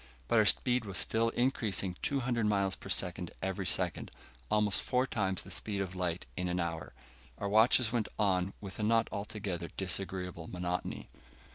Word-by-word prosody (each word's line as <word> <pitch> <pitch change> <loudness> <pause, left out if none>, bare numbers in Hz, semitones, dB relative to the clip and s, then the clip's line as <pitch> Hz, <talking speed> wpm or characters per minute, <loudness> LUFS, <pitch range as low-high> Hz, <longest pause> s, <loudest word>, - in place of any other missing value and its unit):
But - - +4
our - - +5
speed 125 -1 +3
was 100 -4 -3
still 115 +1 +2
increasing 110 -7 +1
200 125 -5 0
miles 100 -2 +2
a - - -8
second 90 -2 0
every 95 -1 -1
second, 90 -4 +1 0.4
almost 105 -2 +2
four 125 0 +1
times 95 -7 -1
the - - -9
speed 105 -2 -2
of 95 -2 -2
light 90 -2 -2
in 90 -1 -1
an 90 0 -1
hour. 85 -2 -3 0.4
Our 100 - -2
watches 110 +3 +5
went 115 -3 0
on 95 -2 +2
with 100 0 -8
a - - -1
not 115 +1 +3
altogether 100 -4 -4
disagreeable 90 -2 -2
monotony. 90 0 -3
95 Hz, 165 wpm, -32 LUFS, 90-110 Hz, 0.4 s, our